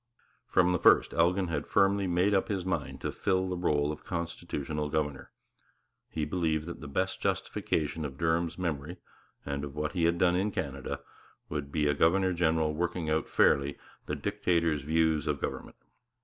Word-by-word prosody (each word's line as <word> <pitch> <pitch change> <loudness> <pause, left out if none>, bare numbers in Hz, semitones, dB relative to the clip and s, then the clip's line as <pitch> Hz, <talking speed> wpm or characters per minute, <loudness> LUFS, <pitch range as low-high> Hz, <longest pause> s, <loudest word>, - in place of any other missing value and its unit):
From 90 - +3
the 90 - +1
first - - +5
Elgin 90 +2 +2
had 80 - -2
firmly 100 0 +3
made 90 +3 +2
up 95 - +2
his 95 -4 -2
mind 95 - -3
to - - -2
fill 95 -1 0
the 90 - -2
rôle 75 -4 +1
of 75 - -8
constitutional 85 -3 -3
governor; 75 -3 -2 0.8
he 80 -2 -2
believed 80 -1 0
that 85 -1 -7
the 75 - -7
best 70 - -1
justification 80 0 -1
of 70 -2 -5
Durham's 85 +1 0
memory, 85 -1 -3 0.5
and 70 0 -3
of 70 -1 -6
what 75 0 -2
he 85 -3 +1
had 85 +1 +2
done 90 0 +3
in 95 +3 +1
Canada, 70 -8 -4 0.5
would 75 -2 -4
be 75 -1 +1
a 75 - +3
governor 90 +5 +3
general 80 -2 +1
working 85 0 -2
out 80 0 0
fairly 70 0 +3 0.3
the 75 - -1
Dictator's 85 -3 0
views 80 0 +1
of 70 -1 0
government. - - -5
80 Hz, 175 wpm, -30 LUFS, 75-90 Hz, 0.8 s, first